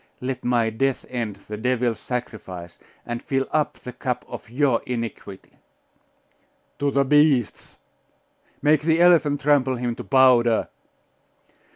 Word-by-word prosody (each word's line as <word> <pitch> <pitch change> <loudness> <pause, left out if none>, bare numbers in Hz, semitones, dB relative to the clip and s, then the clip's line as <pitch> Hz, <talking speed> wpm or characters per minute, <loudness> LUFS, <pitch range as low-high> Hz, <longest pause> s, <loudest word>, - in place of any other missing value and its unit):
Let 130 0 -4
my 120 -2 +1
death 135 +4 -1
end 115 -6 -4
the 105 - -5
devil's 120 -1 0
sacrifice, 95 -9 -6 0.3
and 120 0 -4
fill 135 -1 -1
up 155 -1 0
the 125 - -9
cup 125 0 -3
of - - -9
your 130 -1 +1
iniquity!' 115 -5 -6 1.2
'To 145 - +1
the 140 0 +2
beasts!' 145 -4 +2 0.9
'Make 150 +1 +4
the 160 +1 +2
elephant 160 -5 +4
trample 140 -3 +2
him 120 -1 -2
to - - -6
powder! 125 -4 +4
125 Hz, 130 wpm, -23 LUFS, 115-140 Hz, 1.2 s, Make